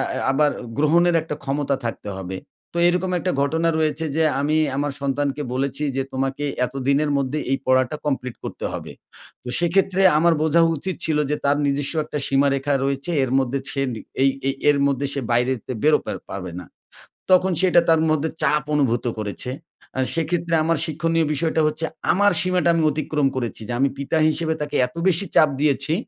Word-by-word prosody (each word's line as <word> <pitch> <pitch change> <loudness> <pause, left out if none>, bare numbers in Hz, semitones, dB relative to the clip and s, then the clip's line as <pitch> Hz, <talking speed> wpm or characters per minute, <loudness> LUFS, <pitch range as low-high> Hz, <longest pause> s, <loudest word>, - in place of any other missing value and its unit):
এ - - -2
আবার 145 +2 +3 0.3
গ্রহণের 170 +3 +3
একটা 155 -2 -5
ক্ষমতা 140 0 -1
থাকতে 110 -2 -4
হবে। 95 0 -5 0.4
তো - - -4
এইরকম 180 +1 0
একটা 180 - -1
ঘটনা 160 +4 +1
রয়েছে 155 0 0
যে 160 - +2 0.2
আমি 155 +2 +1 0.2
আমার 145 0 -1
সন্তানকে 140 +1 -1
বলেছি 135 +2 -1
যে - - +2
তোমাকে 135 +2 -2 0.2
এতদিনের 140 +3 0
মধ্যে 140 +2 -1
এই 135 - +2
পড়াটা 130 +2 +2
complete 125 -4 -2
করতে - - -6
হবে। - - -6 0.5
তো - - -11
সেক্ষেত্রে 190 +2 +1 0.2
আমার 170 +1 +4
বোঝা 160 +2 +4 0.2
উচিত 185 +5 -4
ছিল 155 -2 +1
যে - - +2
তার 145 +1 +3
নিজস্ব 140 +2 -1
একটা 150 - -5
সীমারেখা 140 +1 +1
রয়েছে 140 +4 -2
এর 130 - -2
মধ্যে 135 +1 -1
সে 135 - -2
নি 110 - -6 0.2
এই 135 - +5 0.2
এই 135 - +1 0.2
এর 145 - +4
মধ্যে 140 0 -1
সে 140 - -2
বাইরে 125 +2 +2
সে 130 - -4
বেরোতে 155 0 +4
পা - - -3 0.2
পারবে 90 -3 -6
না। 90 - -10 0.7
তখন 185 +1 +5
সে 190 - +3
এটা 175 - +6
তার 160 -1 +4
মধ্যে 155 +1 0
চাপ 150 0 +2
অনুভূত 125 -4 +1
করেছে। 105 +4 -4 0.5
আ - - 0 0.2
সেক্ষেত্রে 165 +1 0
আমার 165 0 +1
শিক্ষণীয় 165 +1 0
বিষয়টা 160 +2 0
হচ্ছে 155 +2 -2 0.3
আমার 205 +3 +4
সীমাটা 180 -1 +1
আমি 165 -1 +1
অতিক্রম 150 -1 0
করেছি 120 -3 -3
যে, 120 - -3
আমি 140 0 +3
পিতা 140 +3 -1
হিসেবে 160 +1 -1
তাকে 145 0 -4
এত 125 - -21
বেশি 190 +2 +2
চাপ 155 -2 +6
দিয়েছি, 145 +1 +1
145 Hz, 185 wpm, -22 LUFS, 135-165 Hz, 0.7 s, এটা